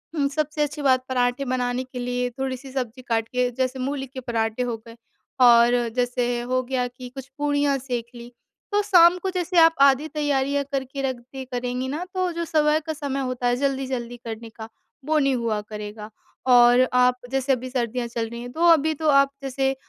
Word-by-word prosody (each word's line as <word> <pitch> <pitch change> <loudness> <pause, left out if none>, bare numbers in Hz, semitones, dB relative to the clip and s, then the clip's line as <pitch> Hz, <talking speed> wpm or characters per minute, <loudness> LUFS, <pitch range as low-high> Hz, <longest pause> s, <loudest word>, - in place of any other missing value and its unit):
उम, 285 -3 +1
सबसे 300 +1 -2
अच्छी 295 0 -4
बात 260 -2 +2
पराठे 250 +1 0
बनाने 250 0 -1
के 255 -1 -9
लिए 245 0 -1
थोड़ी 265 -1 -2
सी 265 +1 -12
सब्जी 255 -2 -4
काट 225 -2 -1
के 250 0 0
जैसे 260 +1 -2
मूली 270 +1 -3
के 260 +1 -8
पराठे 230 -2 -2
हो 240 -2 -3
गए 230 - -11 0.5
और 240 0 +7 0.2
जैसे 245 -1 0
हो 255 +1 0
गया 250 0 -1
कि 250 +1 -10
कुछ 265 +1 -9
पूड़ियाँ 290 -1 +1
सेंक 245 -3 -4
ली, 240 0 -10 0.4
तो 410 0 +3
शाम 355 -3 +6
को 380 - 0
जैसे 360 -1 -2
आप 325 0 +7
आधी 280 +2 +5
तैयारियाँ 285 -2 0
करके 275 0 -3
रख 265 -1 -1
दे 260 +2 -10
करेंगी 250 0 -3
ना, 300 +6 -3
तो 370 -1 0
जो 335 0 -3
सुबह 305 -1 +2
का 320 0 -5
समय 285 -3 -3
होता 255 -1 -2
है 245 - +2
जल्दी-जल्दी 260 -3 -2
करने 225 0 -6
का 220 0 -10 0.4
वो 310 +1 +1
नहीं 275 -2 +2
हुआ 230 -3 -1
करेगा 210 0 -8 0.4
और 245 +1 +6
आप 250 0 +4
जैसे 270 0 0
अभी 255 0 -4
सर्दियाँ 245 -1 -2
चल 230 -1 -3
रही 235 +1 -7
हैं, 245 0 -7
तो 330 +6 +2
अभी 315 -1 +3
तो 310 +1 -1
आप 275 -1 +5
जैसे 270 0 0
अ, - - -14
255 Hz, 205 wpm, -24 LUFS, 245-280 Hz, 0.5 s, और